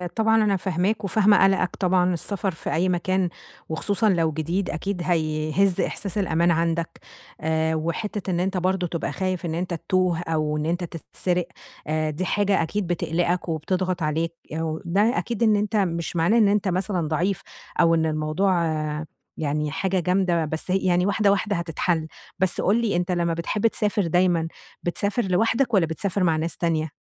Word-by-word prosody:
طبعًا 225 Hz, 0 st, +3 dB
أنا 205 Hz, -2 st, +2 dB
فاهماك 190 Hz, +4 st, -1 dB
وفاهمة 205 Hz, +2 st, +4 dB
قَلَقَك. 195 Hz, -2 st, +2 dB
طبعًا 180 Hz, -1 st, +2 dB
السفر 195 Hz, +3 st, -2 dB
في 165 Hz, -, -5 dB
أي 180 Hz, +3 st, +2 dB
مكان 185 Hz, +1 st, 0 dB, 0.4 s
وخصوصًا 205 Hz, +7 st, +1 dB
لو 165 Hz, -4 st, +2 dB
جديد، 165 Hz, +5 st, -2 dB
أكيد 190 Hz, +3 st, -3 dB
هَيهِز 160 Hz, +2 st, +1 dB
إحساس 200 Hz, 0 st, -3 dB
الأمان 170 Hz, -3 st, +2 dB
عندك. 165 Hz, 0 st, -1 dB, 0.4 s
آآ 160 Hz, 0 st, +1 dB
وحتّة 185 Hz, +5 st, -3 dB
إن 175 Hz, -, 0 dB
أنت 190 Hz, +1 st, 0 dB
برضه 185 Hz, 0 st, 0 dB
تبقى 170 Hz, -1 st, -3 dB
خايف 185 Hz, -1 st, -2 dB
إن 160 Hz, -1 st, -2 dB
أنت 180 Hz, +1 st, -2 dB
تتوه 180 Hz, 0 st, 0 dB
أو 155 Hz, -3 st, -1 dB
إن 150 Hz, -, -2 dB
أنت 175 Hz, +2 st, -1 dB
تتسرق، 175 Hz, +1 st, -3 dB, 0.4 s
آآ 155 Hz, 0 st, 0 dB
دي 155 Hz, +5 st, -3 dB
حاجة 200 Hz, -2 st, +2 dB
أكيد 190 Hz, +4 st, -2 dB
بتقلِقَك 175 Hz, +1 st, -1 dB
وبتضغط 180 Hz, +3 st, -1 dB
عليك 160 Hz, +2 st, -1 dB, 0.2 s
يو 160 Hz, 0 st, -3 dB
ده 205 Hz, +8 st, +2 dB
أكيد 235 Hz, -1 st, -1 dB
إن 215 Hz, -2 st, +5 dB
أنت 210 Hz, +2 st, -1 dB
مش 170 Hz, -5 st, 0 dB
معناه 170 Hz, +7 st, +3 dB
إن 220 Hz, -3 st, +5 dB
أنت 205 Hz, 0 st, +1 dB
مثلًا 185 Hz, -2 st, 0 dB
ضعيف 175 Hz, +5 st, 0 dB, 0.4 s
أو 165 Hz, 0 st, +5 dB
إن 160 Hz, -1 st, +1 dB
الموضوع 155 Hz, +5 st, +1 dB, 0.8 s
يعني 150 Hz, -1 st, -1 dB
حاجة 190 Hz, +4 st, 0 dB
جامدة، 180 Hz, -2 st, +1 dB
بس 160 Hz, +4 st, -4 dB
ه -, -, +3 dB
يعني 180 Hz, -1 st, +2 dB
واحدة، 205 Hz, 0 st, +3 dB
واحدة 200 Hz, +1 st, 0 dB
هتتحَل. 165 Hz, -1 st, -1 dB, 0.3 s
بس 185 Hz, -1 st, +1 dB
قُل 215 Hz, +5 st, +2 dB
لي 220 Hz, -5 st, 0 dB
أنت 175 Hz, +1 st, 0 dB
لمّا 170 Hz, -1 st, +1 dB
بتحب 185 Hz, +6 st, 0 dB
تسافر 210 Hz, -4 st, 0 dB
دايمًا 175 Hz, -1 st, +2 dB, 0.4 s
بتسافر 200 Hz, +6 st, 0 dB
لوحدك 225 Hz, +6 st, +1 dB
والّا 190 Hz, -5 st, +4 dB
بتسافر 185 Hz, +4 st, -2 dB
مع 165 Hz, -3 st, +3 dB
ناس 160 Hz, +2 st, -2 dB
تانية؟ 160 Hz, -2 st, 0 dB
180 Hz, 170 wpm, -24 LUFS, 165-195 Hz, 0.8 s, إن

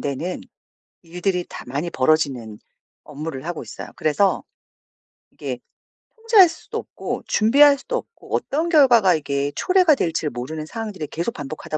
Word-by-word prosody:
되는 145 Hz, +6 st, -3 dB, 0.6 s
일들이 180 Hz, +1 st, -2 dB
다 -, -, -8 dB
많이 145 Hz, +7 st, -3 dB
벌어지는 130 Hz, -7 st, 0 dB, 0.4 s
업무를 150 Hz, -1 st, -7 dB
하고 175 Hz, -2 st, -4 dB
있어요. -, -, -9 dB
그래서 155 Hz, +6 st, +1 dB, 0.9 s
이게 -, -, -6 dB, 0.6 s
통제할 445 Hz, -6 st, +6 dB
수도 330 Hz, -, -8 dB
없고 -, -, -6 dB
준비할 280 Hz, +6 st, +5 dB
수도 -, -, -3 dB
없고 465 Hz, -, -6 dB
어떤 320 Hz, +4 st, -1 dB
결과가 240 Hz, -, +5 dB
이게 140 Hz, -1 st, -2 dB
초래가 365 Hz, -4 st, +4 dB
될지를 165 Hz, -, -1 dB
모르는 155 Hz, +6 st, -5 dB
상황들이 210 Hz, -5 st, -6 dB
계속 170 Hz, +10 st, -3 dB
반복하다 155 Hz, +1 st, -5 dB
170 Hz, 330 characters per minute, -22 LUFS, -, 0.9 s, 통제할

